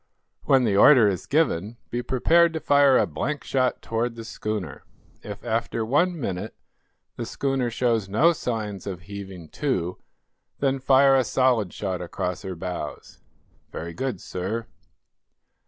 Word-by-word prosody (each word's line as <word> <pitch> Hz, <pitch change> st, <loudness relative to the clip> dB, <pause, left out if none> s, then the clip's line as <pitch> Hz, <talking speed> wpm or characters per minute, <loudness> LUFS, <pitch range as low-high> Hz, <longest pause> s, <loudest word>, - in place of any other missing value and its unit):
When 135 Hz, -2 st, +4 dB
the 105 Hz, -4 st, +1 dB
order 115 Hz, +2 st, +7 dB
is 95 Hz, -3 st, -2 dB
given, 115 Hz, -, 0 dB
be 120 Hz, -, -1 dB
prepared 165 Hz, +8 st, +3 dB
to 160 Hz, -, -2 dB
fire 140 Hz, -3 st, +5 dB
a -, -, +3 dB
blank 140 Hz, -, -3 dB
shot 130 Hz, -2 st, 0 dB
toward 115 Hz, +1 st, -2 dB
the 115 Hz, -, -7 dB
schooner. 105 Hz, -, -5 dB, 0.4 s
If, 105 Hz, -1 st, -8 dB
after 115 Hz, 0 st, -1 dB
one 170 Hz, +8 st, +1 dB
minute, 100 Hz, -4 st, -4 dB, 0.6 s
the 120 Hz, -, -3 dB
schooner 135 Hz, -2 st, -1 dB
shows 115 Hz, -4 st, 0 dB
no 150 Hz, -, +4 dB
signs 110 Hz, -, -4 dB
of 90 Hz, -3 st, -5 dB
heaving 95 Hz, -3 st, -9 dB
to, 90 Hz, -, -2 dB, 0.6 s
then 135 Hz, -1 st, 0 dB
fire 135 Hz, +1 st, +5 dB
a 130 Hz, -, +4 dB
solid 120 Hz, -6 st, +1 dB
shot 95 Hz, -3 st, -4 dB
across 90 Hz, +1 st, -4 dB
her 95 Hz, -2 st, -6 dB
bows." 90 Hz, -3 st, -6 dB, 0.5 s
"Very 85 Hz, +1 st, -6 dB
good, 125 Hz, 0 st, -3 dB
sir." 100 Hz, +7 st, -4 dB
115 Hz, 145 wpm, -24 LUFS, 95-135 Hz, 0.6 s, order